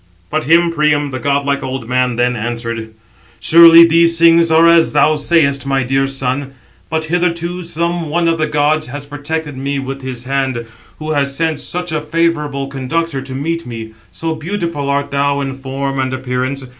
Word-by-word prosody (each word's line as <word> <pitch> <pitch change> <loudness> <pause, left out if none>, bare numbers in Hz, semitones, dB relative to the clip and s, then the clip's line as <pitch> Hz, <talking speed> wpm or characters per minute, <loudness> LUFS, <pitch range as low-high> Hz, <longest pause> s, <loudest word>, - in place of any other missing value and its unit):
But 155 +1 -1
him 170 +2 +4
Priam, 150 -2 +1
the 130 - -4
godlike 140 +1 0
old 130 -3 -5
man, 125 0 0
then 125 +1 +1
answered: 115 -1 -4 0.5
"Surely 170 0 +8
these 170 0 +3
things 165 0 +5
are 160 +1 +5
as 170 -1 +4
thou 155 +1 +3
sayest, 145 -3 +1
my 135 -1 +1
dear 135 +2 0
son. 135 0 -3 0.3
But 160 -1 -1
hitherto 175 +1 -1
some 170 -1 -2
one 170 +2 0
of 165 -1 +1
the 155 - +1
gods 150 +1 +1
has 140 +2 -7
protected 145 +1 -5
me 140 +2 -3
with 135 0 -5
his 130 -2 -5
hand, 130 -2 -2 0.3
who 155 0 -5
has 140 -2 0
sent 160 -2 -1
such 180 +3 -3
a 155 -1 -1
favourable 150 -3 -1
conductor 140 +2 -3
to 130 -1 -8
meet 165 +2 -3
me, 110 -2 -7 0.2
so 165 0 -3
beautiful 165 -3 -4
art 140 0 -1
thou 140 0 0
in 135 -1 -3
form 135 +1 -4
and 130 -1 -1
appearance. 130 +1 -3
145 Hz, 180 wpm, -16 LUFS, 135-165 Hz, 0.5 s, Surely